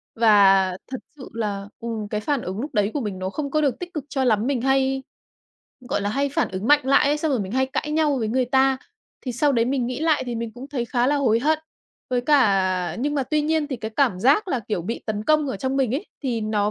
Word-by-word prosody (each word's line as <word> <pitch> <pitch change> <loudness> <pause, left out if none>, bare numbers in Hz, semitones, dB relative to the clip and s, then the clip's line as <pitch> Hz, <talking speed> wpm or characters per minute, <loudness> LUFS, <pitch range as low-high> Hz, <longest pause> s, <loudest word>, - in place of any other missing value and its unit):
và 195 -4 +5 0.2
thật 260 - -3 0.2
sự 260 - -10
là, 205 -3 -3
ừm, 225 -2 -4
cái 210 +1 -3
phản 285 +1 -1
ứng 190 +3 -5
lúc 280 +4 -5
đấy 210 -1 +1
của 290 - -1
mình 205 -5 -4
nó 185 0 -2
không 280 +6 -4
có 305 - +2
được 275 -5 0
tích 360 0 -7
cực 300 -4 -4
cho 270 -3 -1
lắm, 225 -2 +2
mình 270 -4 0
hay, 270 0 +1 0.9
gọi - - 0
là, 200 - -1
hay 280 +4 0
phản 320 +3 0
ứng 190 +3 -4
mạnh 295 -1 +4
lại 275 +1 +4
ấy, 290 +1 +2
xong 310 0 -1
rồi 255 - +1
mình 190 0 -5
hay 265 +1 +2
cãi 285 +3 -3
nhau 305 -2 +2
với 220 -3 -1
người 255 +2 +1
ta. 265 +1 +3 0.4
Thì 255 - -4
sau 285 +4 +2
đấy 230 -3 +2
mình 255 0 0
nghĩ 250 +2 -4
lại 320 -1 +2
thì 240 - -3
mình 230 0 -4
cũng 250 +4 -10
thấy 265 -5 -2
khá 240 +1 0
là 290 +2 +2
hối 240 -6 +2
hận. 310 +4 +2 0.5
Với 250 - +1
cả 195 -10 +2
nhưng 290 +4 -1
mà 280 - +1
tuy 300 +4 0
nhiên 315 0 +1
thì 270 -4 -4
cái 220 -1 -6
cảm 245 -10 +2
giác 285 - +3
là, 260 -8 0
kiểu, 205 -4 -3
bị 225 +7 -4
tấn 215 -1 -3
công 305 +2 +3
ở 260 - -3
trong 265 +6 -2
mình 260 -2 +1
ấy, 330 +9 -3 0.2
thì 245 -5 -1
nó 210 -1 0
255 Hz, 265 wpm, -23 LUFS, 215-285 Hz, 0.9 s, và